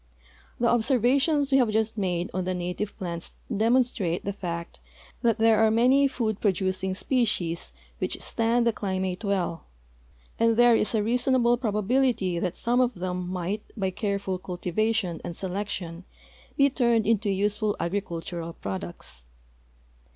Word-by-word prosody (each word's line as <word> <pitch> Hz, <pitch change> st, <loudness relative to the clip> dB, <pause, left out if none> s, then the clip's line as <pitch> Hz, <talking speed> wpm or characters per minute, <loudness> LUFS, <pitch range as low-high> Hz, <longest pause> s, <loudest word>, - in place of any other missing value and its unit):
The 235 Hz, -, +2 dB
observations 265 Hz, +5 st, +2 dB
we 270 Hz, -, +5 dB
have 245 Hz, -4 st, +3 dB
just 220 Hz, +1 st, 0 dB
made 180 Hz, -4 st, -1 dB
on 185 Hz, -, -1 dB
the 185 Hz, 0 st, -1 dB
native 180 Hz, +4 st, -4 dB
plants 170 Hz, -4 st, -5 dB, 0.2 s
demonstrate 225 Hz, -5 st, +1 dB
the 200 Hz, -, -2 dB
fact 170 Hz, -3 st, -5 dB, 0.4 s
that 230 Hz, -3 st, +2 dB
there 225 Hz, -1 st, +4 dB
are 220 Hz, -, +5 dB
man}^ 255 Hz, +5 st, +4 dB
food 220 Hz, -6 st, -2 dB
producing 190 Hz, -1 st, 0 dB
species 190 Hz, -, 0 dB, 0.3 s
which -, -, -1 dB
stand 235 Hz, +1 st, +1 dB
the 235 Hz, -, +3 dB
climate 190 Hz, -1 st, -2 dB
well, 180 Hz, -5 st, -1 dB, 0.7 s
and 230 Hz, 0 st, +3 dB
there 240 Hz, -1 st, +6 dB
is 225 Hz, -, +1 dB
a 215 Hz, -, +2 dB
reasonable 245 Hz, +1 st, +3 dB
probability 215 Hz, -4 st, +1 dB
that 180 Hz, 0 st, -2 dB
some 245 Hz, +2 st, +2 dB
of 250 Hz, 0 st, +1 dB
them 180 Hz, 0 st, -3 dB
might 185 Hz, +3 st, -2 dB, 0.2 s
b}^ 190 Hz, -2 st, -1 dB
careful 200 Hz, -3 st, -2 dB
cultivation 185 Hz, +1 st, -1 dB
and 170 Hz, -, -5 dB
selection 185 Hz, -3 st, -4 dB, 0.5 s
be 280 Hz, -, +6 dB
turned 235 Hz, -4 st, +2 dB
into 220 Hz, -1 st, +2 dB
useful 205 Hz, +2 st, 0 dB
agri 195 Hz, +4 st, 0 dB
cultural 170 Hz, -1 st, -6 dB
products. 85 Hz, -, -5 dB
205 Hz, 145 wpm, -26 LUFS, 180-235 Hz, 0.7 s, there